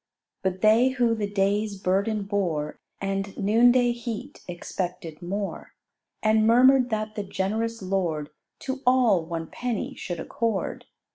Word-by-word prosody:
But 190 0 -2
they 225 +4 +5
who 245 -3 +2
the 210 -2 -2
day's 200 0 0
burden 200 +3 0
bore 180 -7 -2 0.2
And 195 0 -3
noonday 240 +4 +4
heat, 240 +3 -6
expected 175 -2 -5
more: 195 +3 -5 0.5
And 220 0 +4
murmur'd 255 +2 +6
that 215 -1 -2
the 210 - -3
generous 215 +3 -2
lord 170 -6 -1 0.3
To 265 0 -4
all 240 -9 +4
one 165 0 -4
penny 240 +4 -3
should 175 -2 -5
accord. 230 -7 -2
205 Hz, 130 wpm, -26 LUFS, 190-230 Hz, 0.5 s, murmur'd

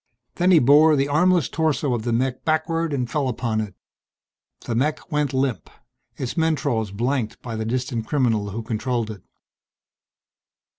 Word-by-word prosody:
Then 180 +1 +3
he 180 - +7
bore 150 +3 +6
the 140 0 +1
armless 175 +3 +3
torso 150 -4 0
of 120 - -1
the 120 +2 -2
mech 125 +2 -1
backward 165 +1 0
and 130 -4 -1
fell 140 +2 -1
upon 115 -3 -1
it. 105 -4 -6 0.9
The 120 - -4
mech 150 +8 -1
went 150 -3 0
limp, 130 -2 -1 0.5
its 130 -3 -3
mentrols 145 - 0
blanked 120 +2 -2
by 115 -2 -5
the 110 0 -3
distant 120 -1 -2
criminal 115 -7 +1
who 110 +3 -5
controlled 115 0 -2
it. 100 -4 -10
130 Hz, 155 wpm, -23 LUFS, 115-150 Hz, 0.9 s, he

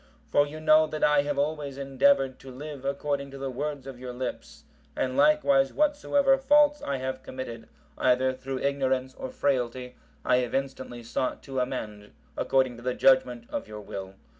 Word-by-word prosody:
For 145 - +4
you 155 +2 -8
know 155 0 +5
that 155 0 -4
I 150 -1 +5
have 145 0 -3
always 145 -1 -2
endeavoured 135 0 +2
to 135 - -12
live 140 +1 -8
according 140 0 -2
to 135 - -9
the 135 0 -4
words 145 +1 -4
of 135 -2 -9
your 125 -1 -6
lips, 125 - -6 0.3
and 130 0 -1
likewise 280 - +4
whatsoever 285 -2 +2
faults 295 +2 +4
I 140 -1 -2
have 130 0 -4
committed, 120 -3 -7 0.3
either 130 +1 +3
through 130 0 -5
ignorance 130 -2 0
or 260 - -6
frailty, 125 - -1 0.3
I - - +4
have 125 -1 -1
instantly 130 -3 -4
sought 125 +2 -2
to 135 -2 -4
amend 105 -5 -4 0.2
according 130 -3 +1
to - - -11
the 125 +1 -2
judgement 125 -3 +3
of - - -4
your 105 0 -8
will." 95 -1 -7
135 Hz, 175 wpm, -27 LUFS, 125-150 Hz, 0.3 s, know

